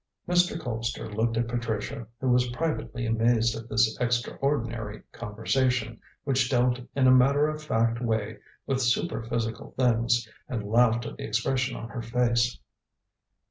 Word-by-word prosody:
Mr. 175 -1 +2
Colpster 115 -4 -4
looked 115 +2 0
at 120 0 +1
Patricia, 115 -1 -3
who 130 -2 0
was 125 0 +3
privately 130 -3 -2
amazed 115 +1 +2
at 115 +1 -8
this 110 0 +3
extraordinary 120 -2 -1
conversation, 115 +1 -1 0.2
which 130 -3 +1
dealt 125 -1 +2 0.2
in 135 -2 +3
a 130 - +7
matter 140 +3 +5
of 155 0 -4
fact 115 -5 0
way 110 -2 -1 0.3
with 135 -1 0
super 120 +3 +1
physical 115 0 -4
things, 120 -2 +2 0.2
and 115 -4 -3
laughed 115 +1 +3
at - - -7
the - - -7
expression 125 +4 0
on 115 - -7
her 120 - -5
face. 120 0 +1
120 Hz, 145 wpm, -27 LUFS, 115-125 Hz, 0.3 s, a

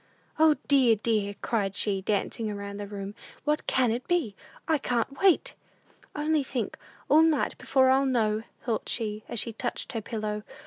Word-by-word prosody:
"O, 315 -1 +6
dear, 260 -5 +5
dear!" 210 -2 0
cried 200 -4 0
she, 200 -2 0
dancing 215 +2 -1
about 200 -1 -5
the 205 0 -5
room; 200 0 -6 0.3
"what 300 +1 0
can 250 -3 +3
it 240 +3 -3
be? 320 - 0 0.3
I 315 -2 +2
can't 245 +2 -1
wait!" 385 -4 +4 0.6
"Only 300 0 +1
think; 250 -4 -3 0.3
all 310 - +6
night 320 -3 +2
before 260 -1 +3
I'll 270 +1 +3
know," 220 -4 +1 0.2
thought 230 -4 -2
she, 215 -2 -2
as - - -4
she 230 - -3
touched 240 +2 -4
her 225 - -3
pillow. 210 -1 -3
230 Hz, 170 wpm, -28 LUFS, 210-275 Hz, 0.6 s, O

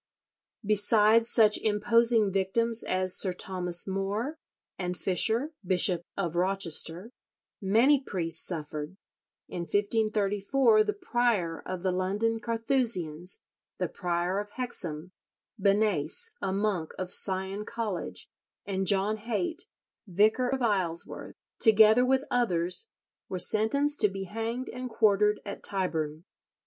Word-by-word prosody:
Besides 215 +2 +4
such 215 -3 +4
imposing 225 0 +2
victims 225 +5 +1
as 185 0 +2
Sir 185 -2 +3
Thomas 180 -1 +1
More, 205 +10 -3 0.4
and 180 -1 -3
Fisher, 225 - +2
Bishop 180 -1 +4 0.2
of 175 -4 -3
Rochester, 180 +1 -1 0.5
many 235 +9 +3
priests 165 - -1
suffered. 155 0 -6 0.5
In - - -7
1534 210 - +1
the 420 - -1
prior 240 - -1
of 185 -1 -5
the 190 - +1
London 205 +5 -1
Carthusians, 225 - -1 0.4
the - - -1
prior 180 +1 -2
of 205 0 -6
Hexham, 180 -10 -3 0.5
Benase, 205 - +1
a - - -2
monk 195 -5 -2
of 185 0 -5
Sion 190 +1 -1
College, 200 - -5 0.4
and 190 -1 -3
John 200 +3 +2
Haite, 325 - -4 0.4
vicar 215 +7 +2
of 265 -1 -2
Isleworth, 185 -7 -2 0.2
together 220 +1 +6
with 265 +1 +1
others, 185 - 0 0.4
were 185 - -3
sentenced 250 +11 +1
to 210 - +4
be 195 0 -6
hanged 225 +6 -5
and 250 +1 -6
quartered 210 -2 +2
at 200 - -7
Tyburn. 160 -5 -2
205 Hz, 115 wpm, -28 LUFS, 185-230 Hz, 0.5 s, together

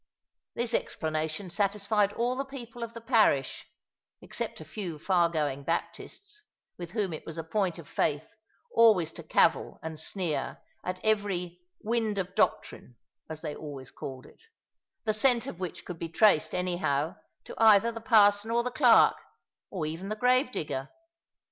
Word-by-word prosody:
This 240 0 -1
explanation 155 +1 -2
satisfied 205 +1 +1
all 240 +3 0
the 270 - -2
people 245 -4 -9
of 230 0 -6
the 230 - -7
parish, 220 - +2 0.5
except - - -4
a 155 - -9
few 170 0 -5
far 175 +1 +2
going 145 -4 -1
Baptists, 400 - -4 0.3
with 175 -1 -7
whom 205 -6 -1
it 155 - -7
was 165 0 -7
a 165 - -3
point 180 +1 -1
of 165 -4 -11
faith 150 +1 0 0.5
always 215 -8 +5
to 170 - -9
cavil 165 +1 +2
and 160 -1 -6
sneer 160 -4 -2 0.3
at 185 0 -4
every 190 -5 0 0.2
"wind 220 -2 0
of 185 -1 -3
doctrine" 210 - -1 0.3
as 160 -1 -6
they 150 -3 -5
always 140 -4 -7
called 130 -2 -8
it - - -18 0.6
the 215 - +2
scent 235 +1 +3
of 175 - -7
which 185 -2 -5
could 175 -2 -7
be 165 - -4
traced, 170 -1 +3
anyhow, 175 -3 -1 0.3
to - - -9
either 225 0 +6
the 230 0 -8
parson 210 -1 +4
or 235 +1 +2
the 250 - -3
clerk, 245 -3 +5 0.5
or 175 -5 -3
even 165 +6 -5
the 215 - -2
gravedigger. 235 - 0
190 Hz, 160 wpm, -29 LUFS, 160-225 Hz, 0.6 s, either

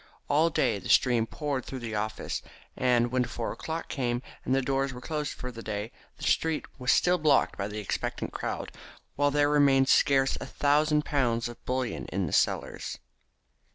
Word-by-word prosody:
All 155 +3 +3
day 120 -9 +1
the - - -8
stream 120 -3 +4
poured 145 -2 -3
through 135 - -6
the 115 -2 -5
office, 110 +1 -3 0.3
and 120 -1 +2
when 130 0 +2
four 120 -1 -4
o'clock 160 +1 -5
came, 120 -2 -2 0.2
and 130 - +1
the 135 - +2
doors 135 +1 0
were 125 - -8
closed 150 +1 -3
for 125 - -6
the 115 -1 -9
day, 105 +1 -4 0.3
the - - -11
street 160 -2 +1
without - - -30
was 125 0 +2
still 180 0 +3
blocked 150 -3 +3
by 100 - -3
the 105 +1 -6
expectant 105 - -3
crowd, - - -4 0.4
while 145 0 +3
there 145 0 +3
remained 140 -2 +4
scarce 135 -1 +4
a - - -5
thousand 150 +1 +2
pounds 120 -5 +1
of 120 0 -11
bullion 125 -1 -2
in 95 0 -1
the 75 - -5
cellars. - - 0
130 Hz, 190 wpm, -28 LUFS, 120-145 Hz, 0.4 s, stream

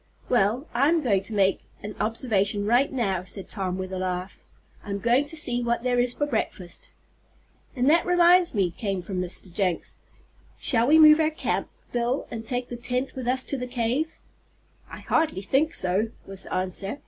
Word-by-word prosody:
"Well, 240 +3 +2
I'm 300 +6 +2
going 200 -7 +2
to 195 +3 -8
make 195 -2 +2 0.2
an 210 +1 -5
observation 210 -3 0
right 245 +6 +3
now," 195 -9 -1
said 185 +1 -6
Tom, 185 -3 -3
with 185 0 -5
a 185 - -3
laugh. 185 0 -4 0.4
"I'm 200 -1 -4
going 240 +7 +2
to 320 - -7
see 245 -6 0
what 235 0 -1
there 250 -1 +1
is 245 0 +1
for 290 - 0
breakfast." 185 -10 -4 0.9
"And 250 0 +1
that 330 +3 +5
reminds 355 -2 +5
me," 190 -4 +1
came 195 -1 -3
from 185 0 -3
Mr. 180 0 -5
Jenks, 185 -3 -2 0.6
"shall 235 -2 +4
we 310 +3 +6
move 305 0 +8
our 315 -1 +3
camp, 315 - -2 0.2
Bill, 240 +2 -1
and 225 -1 -5
take 245 +2 -2
the 240 - -6
tent 250 +2 -2
with 255 -2 -6
us 255 +1 +1
to 275 - -3
the 250 - -4
cave?" 245 +5 0 0.8
"I - - -9
hardly 300 - 0
think 305 - +1
so," 190 +5 0 0.2
was 195 -1 -10
the - - -7
answer. 190 +5 -2
235 Hz, 185 wpm, -25 LUFS, 195-265 Hz, 0.9 s, move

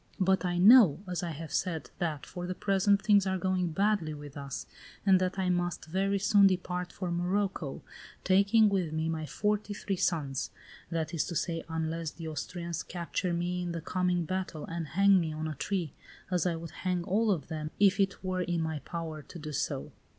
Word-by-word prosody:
But 190 0 +3
I 175 -1 0
know, 200 - +7
as 180 -2 -2
I 175 - -3
have 160 -1 -7
said, 160 -7 -2
that, 160 -6 -2
for 175 -1 -6
the 185 - -3
present, 200 +1 +2
things 205 -2 +4
are 190 0 +1
going 185 -1 0
badly 185 -2 +1
with 145 -1 -10
us, 140 -2 -5 0.4
and 190 -2 +5
that 185 +1 -1
I 185 -1 +1
must 175 -1 -1
very 195 +4 0
soon 200 0 +5
depart 180 -1 -1
for 180 -3 -4
Morocco, 180 -3 -1 0.4
taking 200 +4 +5
with 190 -6 0
me 160 0 -1
my 160 -1 -3
forty 210 +2 -1
three 200 -1 -2
sons; 150 -8 0 0.4
that 165 -1 -2
is 165 - +1
to 170 - -5
say, 165 0 -1
unless 160 0 -2
the 165 +1 -8
Austrians 170 +1 -4
capture 175 +1 -3
me 175 +1 -1
in 175 -1 -3
the 170 - -3
coming 180 0 0
battle 185 -3 -3
and 165 -1 -4
hang 195 +4 +5
me 165 -2 -1
on 155 +1 -3
a 155 - -3
tree, 165 +2 -2 0.4
as 180 -1 +2
I 170 - 0
would 165 0 -7
hang 180 -2 0
all 210 +4 +1
of 180 -7 0
them, 155 -2 -4
if 200 0 +5
it 195 0 +1
were 185 -1 -1
in 175 -2 -1
my 160 -1 -2
power 160 -1 -5
to 175 - -11
do 155 -1 -6
so. 145 - -2
175 Hz, 200 wpm, -30 LUFS, 160-190 Hz, 0.4 s, know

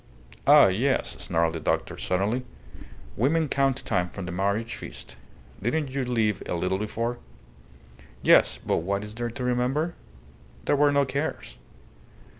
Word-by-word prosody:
"Ah, - - +9
yes!" 115 +9 +1
snarled 85 -1 0
the 80 - -4
doctor, - - -1
suddenly. 100 +7 -1 0.7
"Women 155 +7 +2
count 135 -1 +1
time 90 0 0
from 95 0 -7
the 90 - -5
marriage 100 +5 -1
feast. - - -9 0.5
Didn't 135 +6 -1
you 135 0 -1
live 115 -5 0
a - - -1
little 90 +2 -1
before?" 115 +3 -3 1.0
"Yes; - - +5
but - - +1
what 100 +4 -1
is 105 0 -7
there 120 +1 -3
to 120 +2 -6
remember? 125 +7 0 0.7
There - - +3
were 145 0 +4
no 140 0 +3
cares." 140 - -4
115 Hz, 145 wpm, -26 LUFS, 95-135 Hz, 1.0 s, Ah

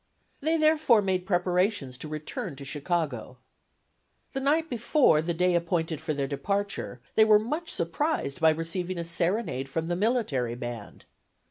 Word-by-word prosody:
They, 320 +3 +1
therefore, 310 -8 +4
made 185 -1 -1
preparations 180 - +1
to 155 - -6
return 155 -2 -5
to 140 - -9
Chicago. 145 -4 -2 1.0
The 270 - -1
night 305 +4 +2
before 240 - +3
the 170 +2 -2
day 180 +1 +2
appointed 165 -2 0
for 155 -1 -2
their 140 -1 -1
departure 195 -1 -2
they 220 - +6
were 215 -1 +7
much 300 +11 -3
surprised 170 - -2
by 160 - +7
receiving 170 +3 -2
a 170 - -2
serenade 170 - -1
from 165 +4 -2
the 175 - 0
military 180 - 0
band. 120 -3 -7
175 Hz, 150 wpm, -27 LUFS, 150-220 Hz, 1.0 s, were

